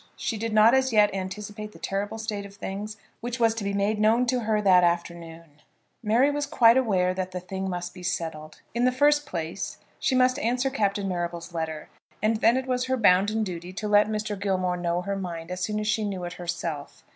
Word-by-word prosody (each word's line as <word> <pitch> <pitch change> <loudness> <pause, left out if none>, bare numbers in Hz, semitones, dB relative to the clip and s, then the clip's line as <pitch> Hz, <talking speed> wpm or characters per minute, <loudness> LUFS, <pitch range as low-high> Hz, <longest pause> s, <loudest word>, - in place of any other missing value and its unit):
She 225 - -3
did 225 +1 -3
not 215 +2 +6
as 265 0 +3
yet 210 -2 +4
anticipate 210 +3 -6
the - - -13
terrible 205 +3 -3
state 215 -2 -4
of 200 0 -11
things 205 +2 -6 0.2
which 240 +1 -4
was 225 -1 +4
to 225 -2 -5
be 200 - -1
made 200 +2 0
known 225 +4 +4
to 250 +1 +1
her 215 -1 +2
that 185 -3 +5
afternoon. 170 -3 -3 0.4
Mary 235 +6 +3
was 290 0 -2
quite 235 -6 +5
aware 190 -8 +2
that 185 0 -3
the 180 - -3
thing 190 +1 -5
must 175 0 -4
be 180 - -11
settled. 160 -3 -4
In 240 +2 +1
the 255 - +4
first 290 +2 +3
place 170 -1 -4 0.2
she 265 - +1
must 255 +1 +3
answer 250 +2 0
Captain 200 -5 0
Marrable's 175 -1 -4
letter. 160 -2 -4 0.3
And 215 +2 +1
then 230 +3 +4
it 260 - -2
was 250 -1 0
her 260 0 0
bounden 210 +1 +3
duty 175 -2 -6
to 210 +2 -4
let 210 0 +5
Mr. 215 -1 -3
Gilmore 185 -2 0
know 175 0 -1
her 200 +1 -2
mind 175 -3 -5
as 180 0 -4
soon 210 +3 -1
as 210 - -3
she 215 0 +1
knew 195 -3 -3
it 175 - -5
herself. 165 -4 -5
205 Hz, 215 wpm, -26 LUFS, 180-225 Hz, 0.4 s, not